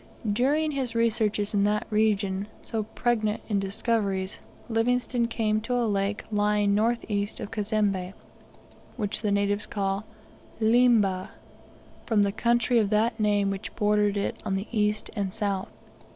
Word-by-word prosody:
During 290 +7 +2
his 260 -5 -3
researches 220 -3 +1
in 200 -1 +2
that 210 +1 +1
region, 205 -2 +1 0.2
so 225 -2 -1
pregnant 220 0 -1
in 205 -3 +1
discoveries, 195 -1 -1 0.3
Livingstone 240 +1 +1
came 215 -2 0
to 245 +3 -2
a 245 -1 +1
lake 200 -1 -1
lying 210 -1 +2
north 230 +3 +1
east 205 -1 -2
of 205 - -6
Cazembe, 205 -4 -1 0.8
which 210 -3 -1
the 210 -2 0
natives 200 0 0
call 195 +1 -2 0.5
Liemba, 220 -5 +3 0.8
from 215 -3 +3
the 200 - +1
country 235 +2 +2
of 210 -3 +1
that 220 +2 +1
name 205 -2 +2
which 195 +1 -6
bordered 210 -1 +2
it 200 - -1
on 195 - -1
the 195 +2 -2
east 210 -2 0
and 200 -3 -2
south. 200 -2 -2
210 Hz, 145 wpm, -27 LUFS, 200-230 Hz, 0.8 s, Liemba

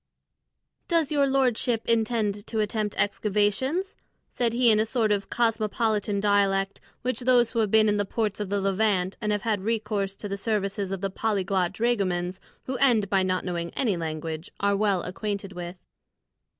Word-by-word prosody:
"Does 330 -4 +1
your 285 -2 +3
lordship 250 -4 +1
intend 220 -3 0
to 220 - -2
attempt 210 0 -1
excavations?" 210 - 0 0.4
said 240 -2 0
he 240 0 +4
in 215 - +4
a - - +4
sort 225 -3 +1
of 200 -1 0
cosmopolitan 220 -2 0
dialect 200 -1 +1 0.2
which 250 -2 -1
those 245 -2 +3
who 230 - -1
have 215 -2 +2
been 215 +1 +5
in 210 0 +2
the 205 - +1
ports 210 0 -2
of 205 -2 -3
the 200 0 0
Levant 195 -1 +1
and 210 -1 0
have 205 -1 -1
had 215 -4 0
recourse 210 -2 -1
to 205 - -7
the 200 0 -3
services 200 -2 -1
of 195 -1 -4
the 195 -1 -2
polyglot 190 -4 0
dragomans 190 -5 -1 0.2
who 260 0 -3
end 230 -7 +3
by 195 -1 +4
not 185 0 0
knowing 170 -2 -3
any 220 -8 +1
language 160 0 -4
are 200 0 +2
well 200 -3 +1
acquainted 200 +1 -4
with. 175 0 -6
210 Hz, 175 wpm, -26 LUFS, 195-225 Hz, 0.4 s, been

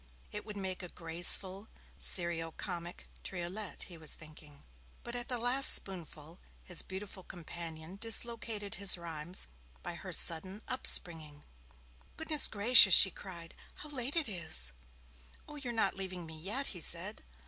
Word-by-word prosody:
It 210 - -9
would 210 -1 -8
make 190 -1 -4
a 180 - -8
graceful, 180 +5 +5 0.3
serio 170 -2 +2
comic 175 -2 -8 0.2
triolet, 185 +3 -6
he 175 -3 -9
was 160 -2 -2
thinking. 150 -2 -16 0.4
But 240 - -6
at 245 0 -4
the 250 -3 -2
last 245 +3 +5
spoonful, 170 -3 -7 0.2
his 180 - -6
beautiful 190 0 -10
companion 170 0 -10
dislocated 225 -2 -1
his 195 -2 +3
rhymes 170 +1 -3 0.4
by - - -6
her - - -10
sudden 185 +5 +1
upspringing. 160 - 0 0.7
'Goodness 315 -2 +1
gracious,' 210 -2 +6
she 190 - +7
cried, 170 -4 -11 0.2
'how 300 - -11
late 270 0 -3
it 325 -5 -1
is!' 160 - -2 0.8
'Oh, 300 - -12
you're 260 -4 -7
not 225 -4 -2
leaving 185 -3 -5
me 160 0 -10
yet!' 210 - -4
he 175 - -4
said. 180 +7 +2
185 Hz, 145 wpm, -31 LUFS, 170-220 Hz, 0.8 s, she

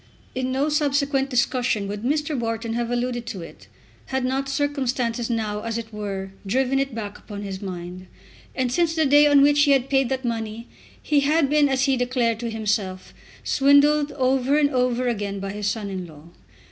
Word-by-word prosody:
In 260 0 -2
no 270 +3 +1
subsequent 285 -2 +1
discussion 250 -5 0
would 205 +1 -5
Mr. 295 +4 -1
Wharton 230 -1 -2
have 235 0 -2
alluded 245 0 -2
to 190 -5 -5
it, - - -13 0.4
had 265 -1 -1
not 270 +1 -1
circumstances 260 -4 -1
now 215 -3 -2
as 230 0 -3
it 225 -1 -7
were 195 -2 -5
driven 260 +6 +1
it 275 -3 -2
back 210 -2 -6
upon 205 -1 -8
his 195 -1 -6
mind. 180 -1 -7 0.5
And 255 -2 0
since 330 +4 +1
the 315 -1 +2
day 290 +2 +6
on 285 -1 +6
which 290 0 +4
he 290 -1 +4
had 270 0 0
paid 270 -3 +3
that 260 -1 -2
money 225 0 -4 0.3
he 295 -1 +2
had 290 0 +2
been, 295 -1 +4
as 265 -1 +1
he 270 -1 +2
declared 245 -2 0
to 235 -1 -3
himself, 210 -4 -2 0.3
swindled 285 +1 +4
over 265 +1 +2
and 290 -1 +3
over 250 -1 +1
again 205 -4 -2
by 195 0 -4
his 205 0 -3
son 205 -1 -2
in 185 -2 -5
law. 155 +1 -15
250 Hz, 190 wpm, -23 LUFS, 215-275 Hz, 0.5 s, day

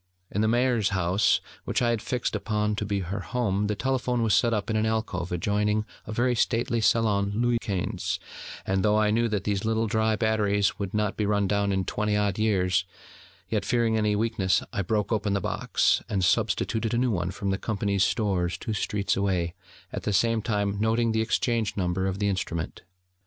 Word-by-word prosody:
In 105 - 0
the 110 - +2
Maire's 120 -2 +2
house, 95 +1 +2 0.2
which - - -1
I 120 -1 +2
had 115 -3 -1
fixed 120 +1 -2
upon 105 -1 -1
to 105 - -2
be 100 -1 -1
her 95 +3 -4
home, 105 -1 -1
the 105 - -1
telephone 125 0 0
was 110 -3 +2
set 120 - +3
up 105 -1 -1
in - - 0
an 110 0 +1
alcove 110 -6 -2
adjoining 105 +4 0 0.2
a - - -5
very 120 +3 +1
stately 120 0 +1
salon 105 -3 +2
Louis 120 +1 +2
Quinze; 95 -5 -2 0.5
and 95 0 +1
though 105 0 +3
I 105 -1 +3
knew 115 +2 +2
that 105 -4 -2
these 100 -1 -1
little 110 0 +1
dry 110 0 +1
batteries 105 -2 +1
would 100 0 -4
not 105 -1 0
be 105 - 0
run 100 -1 +2
down 100 0 +1
in 95 -1 0
twenty 105 +2 0
odd 100 -1 0
years, 95 -4 +2 0.6
yet, 105 -3 -1
fearing 115 +1 +1
any 105 -1 +2
weakness, 105 -3 +1
I - - 0
broke 105 +3 -1
open 105 -2 0
the 100 - +1
box, - - +1
and 95 -2 +1
substituted 115 +5 +1
a - - +1
new 125 0 +2
one 90 -3 -1
from 100 +1 -3
the 95 - -1
Company's 100 -3 0
stores 95 -5 0
two 110 - -4
streets 105 0 -1
away, 90 -4 0 0.4
at - - -3
the 105 - -1
same 115 +3 +2
time 100 -2 -1
noting 115 +1 +2
the 110 0 +1
exchange 115 -1 0
number 95 0 0
of 95 0 -2
the 100 0 0
instrument. 90 -4 -3
105 Hz, 200 wpm, -26 LUFS, 100-110 Hz, 0.6 s, set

